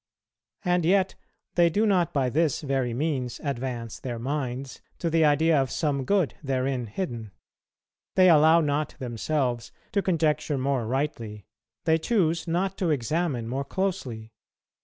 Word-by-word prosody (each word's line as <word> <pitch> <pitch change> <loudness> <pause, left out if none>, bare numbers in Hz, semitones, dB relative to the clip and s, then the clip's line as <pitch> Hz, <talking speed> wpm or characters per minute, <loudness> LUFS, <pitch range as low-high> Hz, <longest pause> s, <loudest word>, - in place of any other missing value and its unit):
And 180 -1 +2
yet 190 +2 +3 0.4
they 170 -1 +4
do 205 +7 +1
not 185 -6 +2
by 130 -3 0
this 155 0 +1
very 135 -4 0
means 130 -2 -2
advance 125 -5 -4
their 120 -3 -4
minds 130 0 -4 0.2
to 170 - -2
the 165 0 +4
idea 150 0 +4
of 135 - -2
some 140 -4 -1
good 190 -4 +2
therein 130 -3 -1
hidden; 115 - -4 0.9
they 185 -1 +6
allow 160 0 +6
not 150 0 -1
themselves 125 0 -2 0.2
to 200 - +2
conjecture 160 -5 +1
more 130 -3 0
rightly, 115 -6 -3 0.4
they 160 0 +3
choose 170 -4 +1
not 185 +3 -1
to 180 - +1
examine 145 -2 0
more 135 +4 -2
closely. 140 - -3
145 Hz, 140 wpm, -26 LUFS, 125-165 Hz, 0.9 s, they